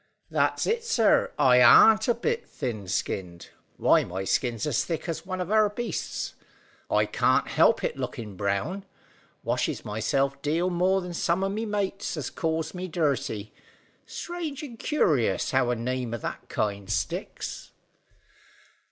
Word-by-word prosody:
"That's - - +1
it, 460 +1 0
sir. 235 - +3
I 125 -3 +5
arn't 220 - +7
a 240 - +3
bit 460 - -2
thin 110 -6 -4
skinned. 90 -3 -3 0.3
Why, - - +4
my 95 +2 -5
skin's 115 +3 0
as 145 -6 +1
thick 165 0 -4
as 165 +2 -4
one 185 -1 -3
of 180 +2 -3
our 215 -1 +4
beasts. 235 +3 -4 0.6
I - - +3
can't - - +2
help - - +3
it - - -2
lookin' 110 -6 -5
brown. 100 - -2 0.6
Washes - - -1
myself 135 +6 -1
deal 165 +5 0
more 185 +2 +2
than 180 -1 -6
some 170 +2 0
o' 195 - +1
my 215 +3 -3
mates 200 -4 -2
as 140 -5 -4
calls 160 -1 -2
me 185 0 -5
dirty. 140 - -1 0.5
Strange 335 -5 -5
and 240 -6 -9
curious 155 - +1
how 130 -2 +2
a 125 - +1
name 120 0 -2
o' - - -3
that - - -6
kind 100 -2 -2
sticks." 95 -5 -3
160 Hz, 150 wpm, -26 LUFS, -, 0.6 s, arn't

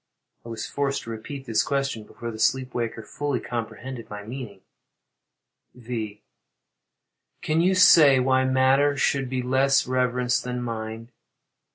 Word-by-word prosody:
[I 115 - -10
was 115 - -5
forced 140 -1 -2
to 115 - -7
repeat 135 +5 -7
this 110 -3 +1
question 135 -6 -2
before 115 +1 -7
the 110 - -9
sleep 130 +2 +1
waker 115 -2 -3
fully 145 +5 -3
comprehended 120 +1 -6
my 105 0 -7
meaning.] 110 -4 -8 1.1
V. 110 -4 -6 1.2
Can 155 +1 +1
you 185 +2 +3
say 150 -7 +7
why 130 0 +2
matter 135 +2 +3
should 135 -2 0
be 130 -1 -2
less 135 +2 +3
reverenced 125 -1 0
than 125 0 -4
mind? 115 0 -5
125 Hz, 140 wpm, -25 LUFS, 115-135 Hz, 1.2 s, say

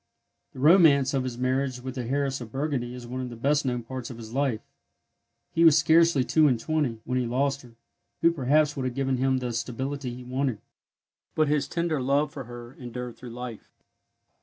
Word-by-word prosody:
The 130 - -10
romance 145 -3 +5
of 135 -2 +1
his 125 -2 -4
marriage 130 0 0
with 130 +1 -6
the 125 -2 -4
heiress 135 +1 -1
of 115 -2 -8
Burgundy 135 -3 -2
is 125 -1 -9
one 125 +2 -5
of 125 - -4
the 120 - -8
best 140 +4 +1
known 125 -1 -1
parts 130 +1 -6
of 120 - -8
his 115 -1 -10
life. 135 -5 0 0.9
He 165 - +3
was 160 -3 +7
scarcely 165 -4 +4
two 155 +4 +4
and 125 -4 +2
twenty 140 -4 -1
when 125 +1 0
he 125 - -1
lost 135 +3 0
her, 120 -2 -17 0.5
who 170 - +5
perhaps 150 0 +2
would 135 -3 -3
have 125 -1 -3
given 135 -1 0
him 130 +1 +2
the 125 -2 -3
stability 130 +3 -3
he 125 - -9
wanted; 130 -1 -1 0.8
but 155 -2 +2
his 150 -1 +1
tender 170 -3 -1
hove 140 +3 +1
for 135 -3 -7
her 120 +1 -10
endured 125 -1 -7
through 125 - -10
life. 120 -1 -8
130 Hz, 205 wpm, -26 LUFS, 125-140 Hz, 0.9 s, was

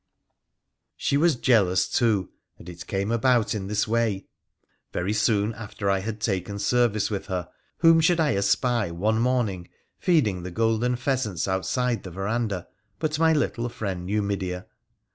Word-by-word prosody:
She - - 0
was 160 +1 +4
jealous, 105 -8 +3
too; 110 -6 +1 0.3
and - - -14
it 85 0 -9
came 100 +2 -1
about 115 -1 +2
in 100 -3 -4
this 105 +2 0
way. 110 -4 0 0.7
Very 95 +4 -1
soon 105 0 +1
after 105 -2 -3
I 95 - +2
had 110 +2 -5
taken 100 -2 -2
service 110 0 +1
with 100 -2 -3
her, 90 -1 -3 0.3
whom 165 -1 +6
should 170 +1 +3
I 155 -2 +3
espy, 100 +2 +1
one 105 +7 0
morning, 115 -8 0 0.3
feeding 115 - +2
the 90 - -6
golden 115 +5 +1
pheasants 125 - -1
outside 120 +6 0
the 95 - -8
verandah 100 0 -2 0.3
but 155 -1 -2
my 165 0 +5
little 120 -6 0
friend 95 -6 -4
Numidea. 100 -3 -2
105 Hz, 150 wpm, -25 LUFS, 95-120 Hz, 0.7 s, whom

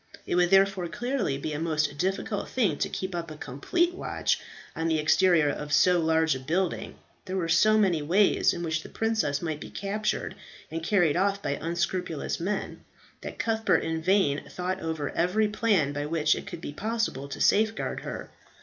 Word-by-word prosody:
It - - -3
would 175 0 +3
therefore 195 -1 +3
clearly 240 - -2
be 150 +2 -4
a 145 - -3
most 155 -2 0
difficult 195 +3 -2
thing 240 -6 +1
to - - 0
keep 190 0 -4
up 170 -1 -4
a 155 - -9
complete 340 - 0
watch 365 - -1 0.4
on 165 0 -1
the 160 -1 +2
exterior 160 +1 +4
of 150 +1 -6
so 180 +4 +5
large 160 -1 +2
a 130 - -4
building. 170 +7 -2 0.3
There 190 -1 -3
were 170 -3 -1
so 215 +6 +4
many 185 -7 +2
ways 185 +7 +3
in 175 - -4
which 160 -1 -1
the - - -11
princess 220 -11 -1
might 155 -3 -2
be - - -8
captured 205 0 -2 0.4
and 165 +1 -3
carried 175 -3 +2
off 200 +1 +1
by - - -1
unscrupulous 170 +1 -2
men, 195 +4 -3 0.4
that - - -7
Cuthbert 225 -1 +1
in 160 0 -2
vain 175 -5 +2
thought 185 +1 -3
over 160 -4 -3
every 180 +6 +1
plan 205 -9 +1
by 145 +1 -3
which 155 -1 +2
it - - -7
could 175 -4 -7
be 145 - -6
possible 220 - -2
to - - -6
safeguard 220 +1 +2
her. - - -7
175 Hz, 185 wpm, -27 LUFS, 155-200 Hz, 0.4 s, so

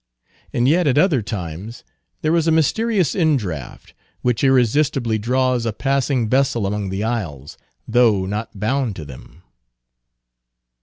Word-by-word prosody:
And 120 +1 +1
yet, 165 +3 +3
at 140 - +2
other 155 - +3
times, 100 +1 -6 0.4
there 155 +2 +2
is 165 -1 +1
a - - +4
mysterious 185 - +1
indraft, 110 - -2 0.3
which 125 0 0
irresistibly 130 -2 +2
draws 125 +2 +1
a 115 - -1
passing 135 -1 0
vessel 125 -3 +1
among 100 0 -2
the 95 +2 -3
isles, 90 - -4 0.3
though 110 -6 +3
not 105 +1 -5
bound 120 0 -1
to 80 - -8
them. 70 +5 -13
120 Hz, 135 wpm, -20 LUFS, 105-140 Hz, 0.4 s, a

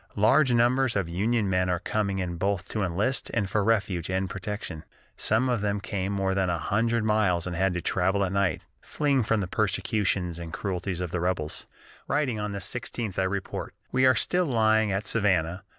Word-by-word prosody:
"Large 125 +7 +4
numbers 120 +2 +3
of 100 -4 0
Union 105 +5 0
men 90 -1 +1
are 90 - +1
coming 100 +2 -1
in 90 -2 -3
both 95 +1 -1
to 110 - -2
enlist 100 +9 0
and 105 -4 +1
for 100 +2 0
refuge 100 -6 0
and 95 0 0
protection. 95 -3 -6 0.3
Some 115 +4 +2
of 120 -4 0
them 105 0 0
came 100 -1 -3
more 95 -1 0
than 95 -1 +1
a 85 - 0
hundred 115 +7 0
miles 105 -6 +2
and 90 -1 -4
had 95 +1 +1
to 85 - -2
travel 95 +2 +1
at 90 - -3
night, 100 -2 +1 0.2
fleeing 140 -3 +1
from 110 -1 +1
the 95 - -2
persecutions 95 -3 0
and 85 -1 -7
cruelties 90 -1 -3
of 90 -2 -3
the 90 - -1
rebels." 85 -3 -2 0.4
Writing 130 -7 0
on 105 0 -3
the 100 - -4
16th, 110 0 -3
I - - +3
report: 95 0 -4 0.2
"We 130 +1 +4
are 130 - +5
still 180 -1 +1
lying 110 -4 +3
at 95 +2 -1
Savannah. 95 -4 +1
100 Hz, 200 wpm, -27 LUFS, 90-110 Hz, 0.4 s, are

